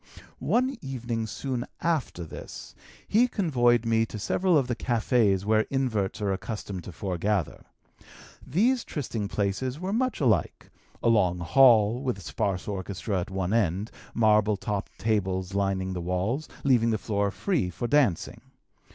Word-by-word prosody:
"One 260 Hz, +3 st, +1 dB
evening, 120 Hz, -4 st, -3 dB
soon 125 Hz, +2 st, -3 dB, 0.2 s
after 155 Hz, -, -1 dB
this, 80 Hz, -, -9 dB, 0.3 s
he 235 Hz, +4 st, +4 dB
convoyed 120 Hz, -, +2 dB
me 115 Hz, 0 st, +3 dB
to 110 Hz, -, -7 dB
several 175 Hz, -, +2 dB
of 135 Hz, -, +2 dB
the 120 Hz, -1 st, -2 dB
café's 115 Hz, -5 st, +1 dB
where 110 Hz, 0 st, +2 dB
inverts 120 Hz, -8 st, -1 dB
are 100 Hz, -1 st, +1 dB
accustomed 100 Hz, -3 st, -5 dB
to -, -, -7 dB
foregather. 95 Hz, +1 st, -2 dB, 0.8 s
These 230 Hz, -, +2 dB
trysting 115 Hz, -8 st, -4 dB
places 105 Hz, +8 st, -2 dB
were 185 Hz, +3 st, -3 dB
much 255 Hz, +2 st, 0 dB
alike: 110 Hz, -, 0 dB, 0.3 s
a -, -, +2 dB
long 95 Hz, -6 st, +3 dB
hall, 110 Hz, +5 st, +5 dB
with 125 Hz, -7 st, -2 dB
sparse 95 Hz, +1 st, -2 dB
orchestra 100 Hz, 0 st, -3 dB
at 85 Hz, -, -6 dB
one 95 Hz, 0 st, -2 dB
end, 100 Hz, -1 st, 0 dB, 0.2 s
marble 105 Hz, -2 st, +3 dB
topped 100 Hz, 0 st, -4 dB
tables 95 Hz, -4 st, -1 dB
lining 95 Hz, -1 st, 0 dB
the 90 Hz, -, -4 dB
walls, 95 Hz, -, -2 dB
leaving 120 Hz, -4 st, +3 dB
the 110 Hz, -, +1 dB
floor 100 Hz, -1 st, -1 dB
free 145 Hz, -, -1 dB
for 120 Hz, +7 st, -4 dB
dancing. 130 Hz, -, +1 dB
110 Hz, 145 wpm, -27 LUFS, 95-130 Hz, 0.8 s, hall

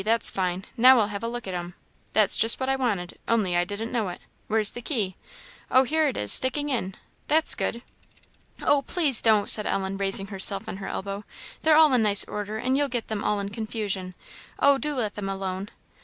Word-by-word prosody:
that's 225 Hz, +3 st, +2 dB
fine; 185 Hz, 0 st, -3 dB
now 255 Hz, +1 st, +6 dB
I'll 210 Hz, -2 st, 0 dB
have 200 Hz, -, -5 dB
a -, -, -2 dB
look 240 Hz, 0 st, -6 dB
at 190 Hz, -, -5 dB
'em. 175 Hz, 0 st, -6 dB, 0.4 s
That's 210 Hz, -2 st, +4 dB
just 225 Hz, +1 st, +4 dB
what 260 Hz, 0 st, -2 dB
I 270 Hz, -, +1 dB
wanted, 210 Hz, -9 st, -3 dB
only 205 Hz, -6 st, 0 dB
I 175 Hz, -, +2 dB
didn't 210 Hz, +5 st, -6 dB
know 225 Hz, -6 st, -2 dB
it. 175 Hz, -, -8 dB, 0.3 s
Where's 215 Hz, -1 st, +3 dB
the 240 Hz, -, -9 dB
key? 215 Hz, -9 st, -3 dB, 0.5 s
Oh, 260 Hz, -, +4 dB
here 310 Hz, +3 st, 0 dB
it 270 Hz, -, -3 dB
is, 105 Hz, -, +3 dB
sticking 290 Hz, +3 st, +2 dB
in 195 Hz, -8 st, -3 dB, 0.3 s
that's 315 Hz, +1 st, +3 dB
good!" 235 Hz, +1 st, -4 dB, 0.8 s
"Oh, 290 Hz, -1 st, +3 dB
please 285 Hz, -5 st, +2 dB
don't!" 215 Hz, -3 st, +3 dB
said 210 Hz, -, +5 dB
Ellen, 195 Hz, 0 st, -2 dB
raising 195 Hz, 0 st, +1 dB
herself 195 Hz, +1 st, +1 dB
on -, -, -6 dB
her 195 Hz, -, -7 dB
elbow, 200 Hz, +1 st, -5 dB, 0.4 s
"they're 310 Hz, -1 st, +4 dB
all 310 Hz, -3 st, +5 dB
in 250 Hz, -, +3 dB
nice 205 Hz, -2 st, +5 dB
order, 210 Hz, +1 st, -6 dB
and 255 Hz, +4 st, -1 dB
you'll 285 Hz, +1 st, +1 dB
get 240 Hz, -3 st, -5 dB
them 215 Hz, -1 st, -4 dB
all 210 Hz, -, 0 dB
in 200 Hz, 0 st, -4 dB
confusion. 205 Hz, -4 st, -5 dB, 0.4 s
Oh, 280 Hz, -1 st, +3 dB
do 300 Hz, +1 st, -2 dB
let 220 Hz, -5 st, -3 dB
them 200 Hz, -2 st, -5 dB
alone!" 195 Hz, 0 st, -5 dB
215 Hz, 215 wpm, -25 LUFS, 195-255 Hz, 0.8 s, now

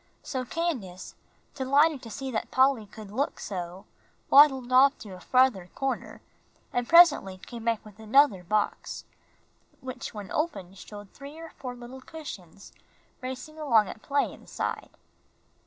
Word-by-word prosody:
So 260 Hz, -2 st, -3 dB
Candace, 245 Hz, -, -4 dB, 0.4 s
delighted 280 Hz, +2 st, +3 dB
to 230 Hz, -, -10 dB
see 265 Hz, +3 st, -5 dB
that 220 Hz, -, -3 dB
Polly 260 Hz, -4 st, +3 dB
could 210 Hz, 0 st, -11 dB
look 270 Hz, +7 st, -2 dB
so, 180 Hz, -1 st, -6 dB, 0.5 s
waddled 270 Hz, -3 st, +6 dB
off 275 Hz, +3 st, +6 dB
to 205 Hz, -3 st, -10 dB
a 185 Hz, -, -10 dB
farther 250 Hz, -4 st, +2 dB
corner, 270 Hz, -1 st, -3 dB, 0.5 s
and 245 Hz, -1 st, -1 dB
presently 330 Hz, -, +6 dB
came 230 Hz, +4 st, -10 dB
back 230 Hz, -2 st, 0 dB
with 210 Hz, 0 st, -15 dB
another 220 Hz, -3 st, +4 dB
box, 210 Hz, +4 st, -2 dB, 0.7 s
which 255 Hz, 0 st, -7 dB
when 205 Hz, -3 st, -8 dB
opened 195 Hz, -, -3 dB
showed 205 Hz, -2 st, -11 dB
three 285 Hz, +2 st, -11 dB
or 330 Hz, 0 st, -9 dB
four 250 Hz, -2 st, -7 dB
little 245 Hz, +2 st, -10 dB
cushions 200 Hz, -, -10 dB, 0.5 s
racing 260 Hz, +5 st, -7 dB
along 230 Hz, -9 st, +3 dB
at 220 Hz, -, -9 dB
play 280 Hz, 0 st, 0 dB
inside. -, -, -5 dB
250 Hz, 140 wpm, -27 LUFS, 210-280 Hz, 0.7 s, waddled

